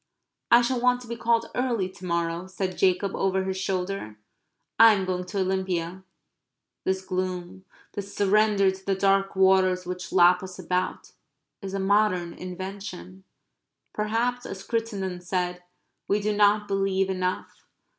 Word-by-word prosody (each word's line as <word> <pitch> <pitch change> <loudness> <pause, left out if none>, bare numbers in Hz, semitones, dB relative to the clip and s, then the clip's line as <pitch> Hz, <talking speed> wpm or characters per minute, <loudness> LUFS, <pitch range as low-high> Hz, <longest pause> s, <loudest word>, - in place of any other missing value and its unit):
"I 235 +1 +7
shall 245 0 0
want 250 0 +3
to 245 - -11
be 235 - -4
called 230 0 0
early 240 -7 0
to 185 0 -12
morrow," 170 0 -1
said 190 0 -3
Jacob, 190 +1 +1
over 190 0 +1
his 190 0 -2
shoulder. 185 - -3 0.6
"I 225 -1 +9
am 190 -1 -2
going 180 -1 -2
to 190 +2 -2
Olympia." 185 -1 -2 0.8
This 190 0 -1
gloom, 185 0 -4 0.3
this 200 0 -6
surrender 205 -1 +3
to 190 0 -11
the 195 0 0
dark 195 0 +2
waters 190 -1 +3
which 180 +1 -6
lap 180 0 +5
us 185 -1 -8
about, 180 0 -2 0.5
is 195 -1 -5
a - - -1
modern 190 -3 +2
invention. 180 - -8 0.7
Perhaps, 230 +4 -1
as 190 -1 -7
Cruttendon 200 -6 -3
said, 180 0 -2 0.5
we 205 - +2
do 210 0 -1
not 210 0 +3
believe 195 -1 +1
enough. 185 0 -4
190 Hz, 145 wpm, -26 LUFS, 185-205 Hz, 0.8 s, I